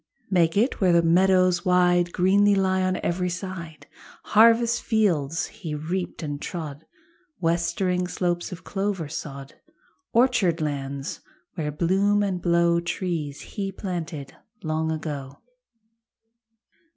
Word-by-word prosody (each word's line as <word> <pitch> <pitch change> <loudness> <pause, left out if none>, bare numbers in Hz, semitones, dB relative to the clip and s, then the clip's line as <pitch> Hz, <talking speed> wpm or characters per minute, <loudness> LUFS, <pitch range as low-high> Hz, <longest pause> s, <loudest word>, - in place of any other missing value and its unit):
Make 170 -1 +3
it 235 +3 +1
where 185 -2 +4
the 170 0 +4
meadows 185 +1 +3
wide 180 -1 +3
Greenly 200 +3 +4
lie 190 -1 +1
on 185 0 +1
every 180 +1 0
side. 175 -3 -7 0.4
Harvest 230 +2 +4
fields 170 - +1
he 155 -3 -7
reaped 170 +4 -4
and 145 -1 -4
trod, 160 -3 -6 0.5
Westering 175 +2 0
slopes 175 -1 -2
of 180 - -8
clover 195 -5 -2
sod, 140 -3 -8 0.5
Orchard 225 -9 +3
lands 140 -2 -4 0.3
where 155 -4 -3
bloom 195 +6 +2
and 185 -3 -2
blow 170 0 +3
Trees 170 -4 -3
he 195 -2 -5
planted 170 -8 -5 0.3
long 160 0 -1
ago. 145 -4 -5
175 Hz, 115 wpm, -25 LUFS, 160-190 Hz, 0.5 s, where